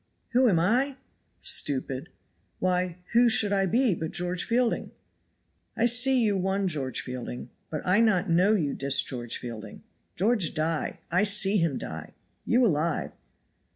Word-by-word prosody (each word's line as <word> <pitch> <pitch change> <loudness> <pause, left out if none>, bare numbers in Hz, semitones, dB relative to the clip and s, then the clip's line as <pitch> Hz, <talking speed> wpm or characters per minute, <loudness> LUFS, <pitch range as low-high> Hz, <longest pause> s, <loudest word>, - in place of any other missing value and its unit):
"Who 255 0 +3
am 180 - +2
I? 255 +10 +1 0.4
stupid. 135 -1 0 0.5
Why, 180 -1 -1 0.2
who 240 +1 +5
should 215 -2 +2
I 195 -1 +2
be 240 +3 +2
but 160 -1 -4
George 180 +1 -2
Fielding?" 240 0 0 0.9
"I 230 - +2
see 245 +1 +3
you 210 -2 +1
one 190 +1 0
George 140 -7 -2
Fielding, 125 -1 -7 0.2
but 155 - -5
I 185 +4 +3
not 210 -5 +2
know 180 +5 +3
you 155 -9 0
dis 140 0 +1
George 120 -3 -4
Fielding. 110 -3 -9 0.3
George 205 -4 +1
die. 155 0 -2
I 180 +3 +3
see 205 0 +3
him 165 -7 0
die. 80 0 -8 0.3
You 245 +1 +3
alive. 165 -4 0
185 Hz, 150 wpm, -27 LUFS, 155-225 Hz, 0.9 s, who